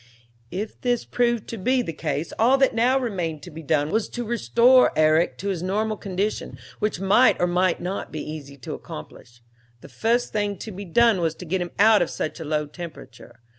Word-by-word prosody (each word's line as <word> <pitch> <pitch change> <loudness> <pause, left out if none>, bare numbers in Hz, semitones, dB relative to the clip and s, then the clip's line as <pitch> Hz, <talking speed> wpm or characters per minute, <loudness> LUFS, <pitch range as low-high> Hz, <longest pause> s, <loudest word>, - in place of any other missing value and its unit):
"If 205 - -5
this 245 -1 0
proved 240 -2 0
to 230 - -5
be 255 +6 +1
the 165 - -5
case, 150 0 -3
all 245 +5 +5
that 270 -1 +3
now 245 +4 +3
remained 175 - -3
to 175 - -9
be 160 +2 -8
done 150 0 0
was 220 -1 0
to 240 - -4
restore 235 - +4
Herrick 155 +2 +3
to 200 - -4
his 185 -4 -2
normal 215 +4 -1
condition, 200 +1 -3 0.2
which 210 -4 -1
might 200 +7 +4
or - - +3
might 180 0 +1
not 185 +3 -4
be 155 - -5
easy 145 -3 -8
to - - -4
accomplish. 120 0 -10 0.4
The - - -12
first 235 +2 0
thing 205 -2 -1
to 220 - -7
be 200 +1 -7
done 220 +2 +3
was 165 -1 0
to 180 - -9
get 185 +2 -1
him 175 - -3
out 215 +1 +6
of 175 - 0
such 155 - -4
a - - -5
low 150 0 -1
temperature. 150 -7 -11
190 Hz, 210 wpm, -24 LUFS, 160-225 Hz, 0.4 s, out